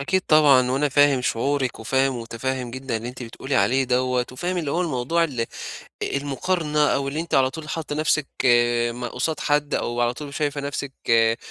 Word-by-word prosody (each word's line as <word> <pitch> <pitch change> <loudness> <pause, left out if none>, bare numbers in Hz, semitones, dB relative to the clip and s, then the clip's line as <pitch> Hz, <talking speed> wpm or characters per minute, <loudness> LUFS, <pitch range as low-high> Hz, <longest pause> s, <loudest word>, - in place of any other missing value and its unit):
أكيد 185 +7 +1
طبعًا، 140 -5 +5
وأنا 140 +3 +1
فاهم 145 -1 +4
شعورِك 130 0 -1
وفاهم 135 +3 +1
ومتفهّم 120 +2 -4
جدًا 130 -2 -4
اللي 115 +2 -5
أنتِ 125 +1 -8
بتقولي 125 +3 -5
عليه 135 +1 +3
دوّة، 125 0 +1
وفاهم 175 +8 -3
اللي 155 -5 -2
هو 175 - 0
الموضوع 165 +1 0
ال 125 -7 -2 0.6
المقارنة 150 +2 0
أو 140 0 0
اللي 150 +3 -2
أنتِ 170 - -4
على 130 -1 +4
طول 155 +1 -8
حاطّة 155 -2 -4
نفْسِك 155 -1 +1 0.6
ما 120 0 -5
قصاد 145 +4 -2
حد 145 0 +1
أو 120 0 -1
على 120 0 +1
طول 145 0 -8
شايفة 145 -1 -1
نفْسِك 140 -1 -4 0.2
آآ، 115 0 +4
135 Hz, 185 wpm, -23 LUFS, 125-150 Hz, 0.6 s, طبعًا